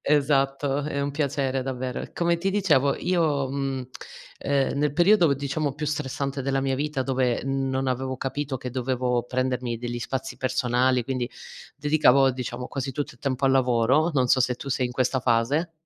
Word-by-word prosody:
esatto, 140 -1 +1
è 145 -1 -2
un 140 0 -1
piacere 140 -2 -1
davvero. 130 -1 -3
Come 170 0 +1
ti 190 +3 0
dicevo 155 -9 +3
io, 155 -7 +1
mhmm, 135 -2 -3 0.5
ehm, 140 0 0
nel 150 -1 +1
periodo 175 -2 +4
diciamo 140 +1 -2
più 150 +1 -4
stressante 140 -1 -2
della 135 0 0
mia 135 -1 0
vita, 145 -1 -1
dove 130 -2 0
non 135 -1 -1
avevo 130 +1 -2
capito 135 +1 -3
che 125 - -6
dovevo 125 -1 -1
prendermi 125 -1 -1
degli 120 +1 -4
spazi 130 +3 -4
personali, 125 0 +1
quindi 125 0 -2 0.5
dedicavo 140 -3 +4
diciamo 125 -1 -5
quasi 135 -1 -4
tutto 145 -1 -4
il - - -23
tempo 135 -1 -1
al 135 - +4
lavoro, 130 +4 +3
non 130 -3 +2
so 130 - +5
se 125 0 +2
tu 140 - -8
sei 130 -1 0
in 125 - -7
questa 130 +1 +1
fase. 130 +8 +1
135 Hz, 175 wpm, -25 LUFS, 125-145 Hz, 0.5 s, so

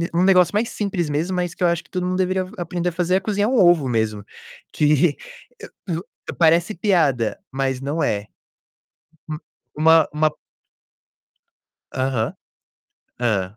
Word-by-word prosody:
um 175 - +3
negócio 185 -1 +4
mais 225 +3 0
simples 190 -6 -2
mesmo, 165 +6 -1
mas 180 -1 -2
que - - -4
eu - - +5
acho 170 0 0
que - - -26
todo 180 -1 -2
mundo 185 0 -1
deveria 185 0 0
aprender 175 +1 -2
a - - -7
fazer: 180 +1 +1
é - - -2
cozinhar 205 +2 0
um 260 - +1
ovo 175 -7 +4
mesmo, 110 -3 -1 0.5
que 150 +1 +3 0.7
e - - -1 0.4
o - - -8
parece 170 +4 +3
piada, 160 - +1
mas 135 -1 -1
não 145 +4 -2
é. 105 0 -1 1.5
U 150 - -5
uma 160 -1 +6
uma 155 0 +2 1.6
Aham, 130 -4 -1 0.9
hã. 105 -4 -1
165 Hz, 150 wpm, -21 LUFS, 135-180 Hz, 1.6 s, uma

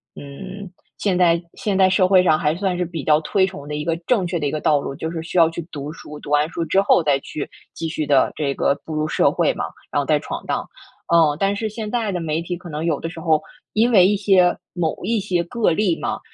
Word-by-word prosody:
嗯， 190 +7 -9 0.3
现 190 -3 +1
代 170 -1 +4
现 205 -3 -2
代 190 -1 +5
社 185 0 +3
会 185 -1 +5
上 155 -3 +4
还 155 +1 0
算 185 -1 -1
是 180 - 0
比 165 -3 -6
较 150 0 +4
推 190 +4 +2
崇 145 -6 -9
的 150 - -4
一 150 - -3
个 165 0 0
正 200 -8 +2
确 170 - -2
的 145 - -2
一 - - -2
个 155 - -3
道 150 -2 +3
路， 140 - -5
就 160 +1 -4
是 165 -2 -4
需 170 - -4
要 165 -1 +6
去 170 +1 -5
读 145 +1 -6
书， 150 -2 -10
读 - - -10
完 150 +1 +3
书 170 0 -3
之 190 +5 +3
后 200 - +4
再 145 -2 +3
去 145 - -6 0.2
继 165 - -4
续 155 -2 -2
地 140 -2 +3
这 140 -2 -1
个 140 - +1
步 160 - -6
入 155 0 0
社 - - +2
会 - - +1
嘛， - - -3 0.3
然 - - +1
后 - - -1
再 - - +2
闯 - - -6
荡。 - - -2 0.5
嗯， 155 -3 +4
但 195 +1 +1
是 220 +1 -2
现 215 0 -5
在 225 -4 -1
的 180 - -2
媒 160 0 -2
体 175 +1 -4
可 175 -1 -11
能 150 +1 -4
有 155 -4 0
的 165 - -4
时 165 -1 -9
候， 160 -2 +2 0.3
因 230 +3 +3
为 185 -5 +7
一 205 0 +2
些 185 -3 +3 0.2
某 170 -3 -1
一 230 -1 +1
些 180 -3 0
个 230 -1 +1
例 180 -1 +1
嘛， - - -3
170 Hz, 285 characters per minute, -21 LUFS, 155-190 Hz, 0.5 s, 为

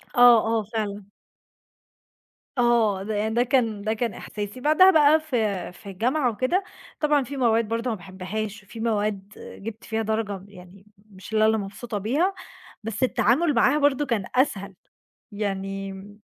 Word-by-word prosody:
آه، 245 -1 +8
آه، 225 0 0
فعلًا. 205 -2 -5 1.5
آه. 230 -5 +2
ده 215 +1 -3
يع 210 +1 0
ده 235 +2 +2
كان 230 -5 +1
ده 215 +2 -1
كان 230 0 -2
إحساسي. 205 +3 -7
بعدها 310 +8 +6
بقى 310 -1 +5
في 215 - -2
في 200 +2 -12
الجامعة 245 +8 0
وكده، 255 - 0 0.4
طبعًا 300 -2 +2
في 280 +2 -7
مواد 230 -3 +2
برضه 230 +2 -2
ما 225 - -1
باحبهاش، 195 +3 -6
وفي 215 +3 -11
مواد 210 -3 -1
جِبت 220 +2 -9
فيها 225 0 -2
درجة 215 -3 -2
يعني 190 0 -15 0.3
مش 195 +2 -12
لا 215 0 +4
اللي 220 0 +3
مبسوطة 210 +2 -5
بيها، 285 - 0 0.5
بس 220 +2 -3
التعامل 255 +6 +2
معاها 290 - +4
برضه 290 0 +2
كان 230 -8 -1
أسهل 200 -7 0 0.6
يعني 195 -1 -3
م 205 +2 -12
220 Hz, 155 wpm, -24 LUFS, 200-245 Hz, 1.5 s, آه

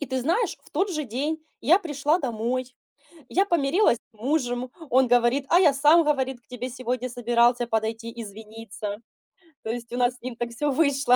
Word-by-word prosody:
И 290 - -3
ты 260 0 -2
знаешь, 340 - 0
в - - -21
тот 385 +6 0
же 305 -4 -2
день 280 +7 -2 0.2
я 335 +10 +5
пришла 300 -2 0
домой, 250 -1 -3 0.6
я 390 +2 +2
помирилась 345 - +2
с 220 - -31
мужем. 250 -1 -1 0.2
Он 260 +1 +4
говорит: 245 +3 +3
"А 345 - +6
я 315 -6 +5
сам". 300 +5 +5
Говорит: 265 -4 0
"К - - -42
тебе 250 0 -5
сегодня 255 0 -3
собирался 240 0 +2
подойти 225 +1 -2
извиниться". 215 0 -7 0.7
То 220 - -2
есть 235 0 -6
у - - -2
нас 245 0 +2
с - - -21
ним 250 -1 -6
так 240 0 -3
всё 290 +5 -1
вышло 275 -3 +3
255 Hz, 190 wpm, -25 LUFS, 235-290 Hz, 0.7 s, А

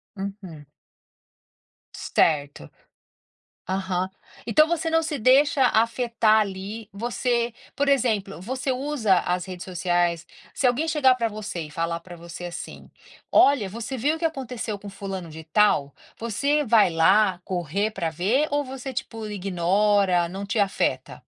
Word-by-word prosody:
Uhum. 190 -6 -7 1.3
Certo, 145 - 0 1.0
aham. 185 -1 -1 0.4
Então 305 +8 +4
você 330 -1 -1
não 325 0 +2
se 305 -2 -2
deixa 270 +3 +4
afetar, 230 -1 +2
ali, 205 +2 -5
você, 235 +2 -1 0.2
por 285 0 0
exemplo, 220 -9 +1
você 260 +5 -2
usa 255 -7 +1
as 180 +1 -2
redes 185 -1 -7
sociais 175 -2 0 0.3
se 265 - -1
alguém 280 +7 +1
chegar 270 -5 +4
pra 230 -2 0
você 210 -4 -5
e 150 - -10
falar 165 +1 -2
pra 175 0 -12
você 170 +1 -9
assim: 175 0 -8 0.4
"Olha, 255 -9 +4
você 230 +5 -5
viu 290 +7 +1
o - - -9
que 335 - -1
aconteceu 250 -8 -4
com 205 - -9
fulano 190 -3 -6
de 160 +1 -10
tal?" 155 -5 +2 0.2
Você 280 +7 0
vai 215 -4 +5
lá 185 +3 +3
correr 185 +4 -1
pra 170 -5 -2
ver 210 - +1
ou 290 0 +1
você, 265 0 -7
tipo, 225 -4 -5
ignora, 195 -1 +1
não 195 +3 -6
te 210 +2 -1
afeta? 200 -1 0
210 Hz, 145 wpm, -24 LUFS, 180-250 Hz, 1.3 s, vai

